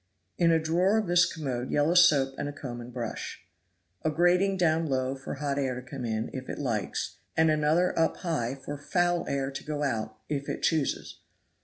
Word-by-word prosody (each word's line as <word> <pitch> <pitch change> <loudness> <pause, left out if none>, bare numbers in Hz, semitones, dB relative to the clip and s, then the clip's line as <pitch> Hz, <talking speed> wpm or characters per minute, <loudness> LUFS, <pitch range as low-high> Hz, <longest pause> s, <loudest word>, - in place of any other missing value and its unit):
In 170 - +5
a 165 - +5
drawer 175 +6 +2
of 220 - +1
this 175 0 +4
commode 130 -6 -3
yellow 145 +3 +2
soap 150 -7 +5
and 145 - -2
a - - -4
comb 125 -4 -7
and 120 +1 -9
brush. 120 -2 -5 0.6
A 155 - +1
grating 180 +4 +3
down 165 -2 +2
low 130 -1 0
for 135 +1 -6
hot 140 0 -2
air 130 -2 0
to 125 - -13
come 130 -3 -5
in, 110 0 -2
if 130 -1 -6
it - - -4
likes, 115 -9 -2 0.2
and 160 0 +5
another 155 +4 +2
up 165 - +2
high 140 -8 -2
for 140 +1 -7
foul 175 +3 +1
air 135 0 -1
to 135 0 -6
go 150 -1 -3
out, 110 -5 -2
if 140 -1 -3
it - - -4
chooses. 155 -4 0
145 Hz, 200 wpm, -28 LUFS, 130-165 Hz, 0.6 s, In